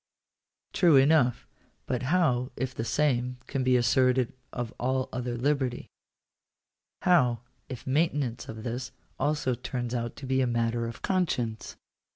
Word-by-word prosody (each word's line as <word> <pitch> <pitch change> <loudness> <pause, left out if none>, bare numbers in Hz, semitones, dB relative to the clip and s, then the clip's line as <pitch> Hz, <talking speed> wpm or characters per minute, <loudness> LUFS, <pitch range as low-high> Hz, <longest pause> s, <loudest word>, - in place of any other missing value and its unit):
True 170 -5 +5
enough; 135 -2 +4 0.4
but 125 -2 -2
how 135 -8 +2
if 130 -1 -3
the 115 - -3
same 125 -2 0
can 135 -1 -2
be 130 0 +4
asserted 125 +1 +2 0.2
of 120 -2 -4
all 130 +1 0
other 125 -1 -3
liberty? 130 -1 -1 1.1
H&w 130 -10 +4 0.3
if 130 -3 -7
maintenance 140 -4 0
of 110 -1 -7
this 120 +1 -4 0.3
also 145 -2 +1
turns 120 0 -4
out 120 -1 -3
to 135 - -9
be 130 0 +1
a 130 - +2
matter 115 0 0
of 115 - -9
conscience 125 - -1
125 Hz, 140 wpm, -28 LUFS, 120-135 Hz, 1.1 s, True